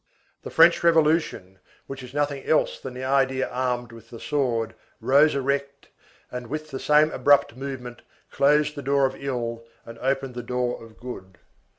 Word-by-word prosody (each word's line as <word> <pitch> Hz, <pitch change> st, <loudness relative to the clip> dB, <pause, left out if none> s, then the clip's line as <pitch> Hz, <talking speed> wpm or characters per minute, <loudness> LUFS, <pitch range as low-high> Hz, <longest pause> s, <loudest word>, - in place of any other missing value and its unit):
The -, -, -8 dB
French 165 Hz, +1 st, +5 dB
Revolution, 155 Hz, -, +2 dB, 0.3 s
which 135 Hz, 0 st, -8 dB
is 125 Hz, -1 st, -10 dB
nothing 145 Hz, -1 st, -1 dB
else 155 Hz, -, +1 dB
than 130 Hz, -2 st, -8 dB
the 130 Hz, -, -6 dB
idea 135 Hz, 0 st, +1 dB
armed 125 Hz, -1 st, -2 dB
with 115 Hz, -1 st, -14 dB
the 115 Hz, -, -10 dB
sword, 120 Hz, -6 st, -1 dB, 0.3 s
rose 145 Hz, +3 st, +4 dB
erect, 140 Hz, +1 st, -2 dB, 0.4 s
and, 125 Hz, -1 st, -6 dB
with 155 Hz, +4 st, -5 dB
the 135 Hz, -, -4 dB
same 150 Hz, +1 st, +4 dB
abrupt 140 Hz, -4 st, +3 dB
movement, 130 Hz, -2 st, -7 dB, 0.3 s
closed 150 Hz, +2 st, +3 dB
the 145 Hz, -, -7 dB
door 140 Hz, +1 st, +2 dB
of 130 Hz, -, -2 dB
ill 120 Hz, -4 st, -4 dB, 0.2 s
and 115 Hz, 0 st, -11 dB
opened 135 Hz, 0 st, -1 dB
the 120 Hz, -, -5 dB
door 125 Hz, 0 st, -2 dB
of 115 Hz, -1 st, -15 dB
good. 95 Hz, -7 st, -9 dB
135 Hz, 170 wpm, -24 LUFS, 125-145 Hz, 0.4 s, French